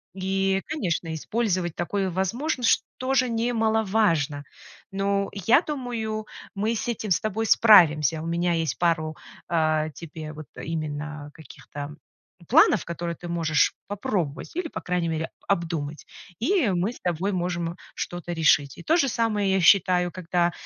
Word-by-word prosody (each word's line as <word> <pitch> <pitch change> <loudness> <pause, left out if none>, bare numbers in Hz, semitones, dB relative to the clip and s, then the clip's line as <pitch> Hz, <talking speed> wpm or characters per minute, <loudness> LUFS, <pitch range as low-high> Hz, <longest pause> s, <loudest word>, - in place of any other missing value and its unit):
и, 195 0 0
конечно, 175 - -2
использовать 185 -1 -1
такое 190 +2 -1
возможно, 240 - -2
что - - +4
тоже 255 -1 +1
немаловажно, 220 - +1 0.5
но 200 0 0
я 225 - +4
думаю, 235 -8 -4 0.3
мы 215 +3 0
с 225 - -3
этим 215 -3 -3
с 170 - +4
тобой 220 +1 -1
справимся. 160 - +6
У - - -6
меня 170 +1 0
есть 165 -2 -1
пару, 160 -2 +1 0.3
э, 155 -2 +1
тебе 155 -1 -8
вот 155 -3 -10
именно 150 -1 -5
каких-то 145 -1 -9 0.5
планов, - - +5
которые 170 0 -4
ты 175 - -9
можешь 165 -3 +2
попробовать 190 - -3
или, 355 -2 -2
по - - -6
крайней 175 -2 -1
мере, 160 0 -2 0.2
обдумать, 165 -5 -2 0.3
и 300 - +2
мы 185 +4 0
с - - -13
тобой 180 +3 -1
можем 175 -1 -2 0.2
что-то 175 0 -5
решить. 150 -4 +3
И - - -9
то 330 - +3
же 280 -5 +3
самое 215 -4 0
я 190 - +3
считаю, 180 -1 +4
когда 175 -1 0
180 Hz, 145 wpm, -25 LUFS, 160-215 Hz, 0.5 s, справимся